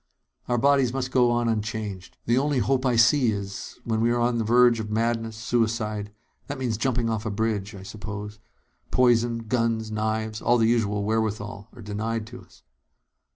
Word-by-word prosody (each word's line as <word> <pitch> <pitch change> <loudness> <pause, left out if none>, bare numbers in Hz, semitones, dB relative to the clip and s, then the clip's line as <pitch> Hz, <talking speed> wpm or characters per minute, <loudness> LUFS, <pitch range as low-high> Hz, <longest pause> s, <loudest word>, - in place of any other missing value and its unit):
"Our 120 - +1
bodies 135 -1 +3
must 130 -1 -2
go 125 -2 +4
on 120 0 +1
unchanged. 105 -3 -3
The 120 +2 +3
only 145 0 0
hope 130 +1 +1
I 125 - +2
see 120 +1 +5
is 100 -1 -6
when 110 -1 -1
we 115 - +3
are 120 0 +1
on 120 0 +1
the - - +1
verge 120 +1 +5
of 110 -1 -4
madness, 115 0 -1
suicide. 110 -3 -1 0.4
That 145 - -4
means 125 -4 -1
jumping 120 0 0
off 110 -2 -1
a 110 - -2
bridge, 105 -1 -2
I 95 - -9
suppose. 105 +1 -7 0.5
Poison, 120 -2 +2
guns, 115 -2 0
knives 110 0 -2
all 120 - +3
the 115 - +3
usual 105 -3 +1
wherewithal 105 -1 -2
are 120 - -11
denied 110 +2 -3
to 125 - -8
us." - - -21
115 Hz, 180 wpm, -25 LUFS, 105-120 Hz, 0.5 s, see